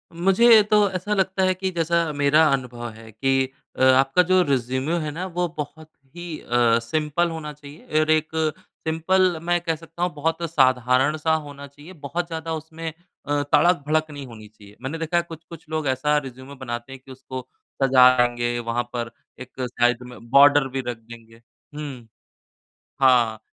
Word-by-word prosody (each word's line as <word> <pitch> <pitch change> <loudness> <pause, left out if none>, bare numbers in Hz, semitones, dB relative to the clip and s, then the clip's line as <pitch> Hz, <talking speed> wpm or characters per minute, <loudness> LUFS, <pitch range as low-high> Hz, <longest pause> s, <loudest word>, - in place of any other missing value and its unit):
मुझे 215 +6 +6
तो 210 -2 +4
ऐसा 185 +3 -3
लगता 190 -1 0
है 185 0 +3
कि 190 +1 -3
जैसा 170 -1 0
मेरा 145 +2 +4
अनुभव 120 -3 -3
है 110 0 -13
कि 135 +3 0 0.3
अ, - - +1
आपका 135 +6 +5
जो 185 +1 +3
रिज़्यूमे 130 +4 -1
है - - -3
ना 175 +5 -5
वो 180 -1 -2
बहुत 155 +1 -7 0.3
ही 175 -2 -7
अ, 120 -1 +2
सिंपल 155 +7 -1
होना 160 -2 -6
चाहिए 150 +1 -4
और 155 0 +1
एक 155 0 +2 0.6
सिंपल 175 +2 +1
मैं 175 0 +1
कह 165 -2 -1
सकता 165 +2 -7
हूँ 180 -1 -1
बहुत 160 +3 -2
साधारण-सा 135 +3 +2
होना 140 0 -10
चाहिए, 145 +6 -14
बहुत 165 +3 -4
ज़्यादा 165 -1 -5
उसमें 160 +1 -6 0.4
अ, 145 0 0
तड़क-भड़क 155 0 +2
नहीं 140 -2 -8
होनी 110 -2 -12
चाहिए। 105 -1 -18
मैंने 140 +5 -4
देखा 165 +1 -1
है 170 - +2
कुछ-कुछ 165 -1 -12
लोग 155 -2 -2
ऐसा 150 +3 +1
रिज़्यूमे 135 0 -7
बनाते 120 -1 -6
हैं 130 - -11
कि 135 - -12
उसको 130 0 -8 0.4
सजाएँगे, 125 -2 +4
वहाँ 120 +1 -2
पर 120 -1 -4 0.3
एक 130 0 -9
साइड 120 0 0
में 120 -1 -13
बॉर्डर 140 +1 +6
भी - - 0
रख 120 -2 -3
देंगे। 115 0 -15 0.3
हुँ 135 -6 -7 0.9
हाँ, 120 -4 +4
145 Hz, 170 wpm, -23 LUFS, 125-165 Hz, 0.9 s, मुझे